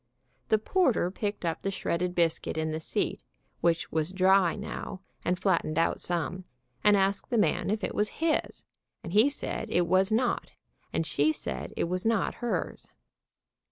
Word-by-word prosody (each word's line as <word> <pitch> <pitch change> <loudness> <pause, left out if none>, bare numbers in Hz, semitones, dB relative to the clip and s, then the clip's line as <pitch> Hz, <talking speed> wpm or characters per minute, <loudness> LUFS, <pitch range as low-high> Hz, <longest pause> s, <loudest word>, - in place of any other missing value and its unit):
The 220 - +5
porter 230 - +2
picked 205 -1 -3
up 165 -1 -1
the 195 - -1
shredded 180 -2 -2
biscuit 165 -2 +1
in 160 0 -1
the 155 - -2
seat, 160 - -2 0.4
which 170 -1 +1
was 160 +2 0
dry 190 -2 +4
now, 185 - -6 0.2
and 180 +1 +1
flattened 180 -5 +1
out 165 - +2
some, 175 +1 -2 0.4
and 210 -1 +6
asked 195 0 +1
the 240 - +1
man 210 - +2
if 210 +1 -1
it - - -2
was 210 0 +1
his, 325 -1 0 0.4
and 170 - -6
he 220 +7 +6
said 235 -5 -4
it 175 -5 +2
was 185 +4 +3
not, 235 +2 0 0.4
and 165 - 0
she 150 0 +2
said - - -5
it - - +1
was 180 +2 -2
not 225 -2 +1
hers. 240 - -3
185 Hz, 170 wpm, -29 LUFS, 170-210 Hz, 0.4 s, and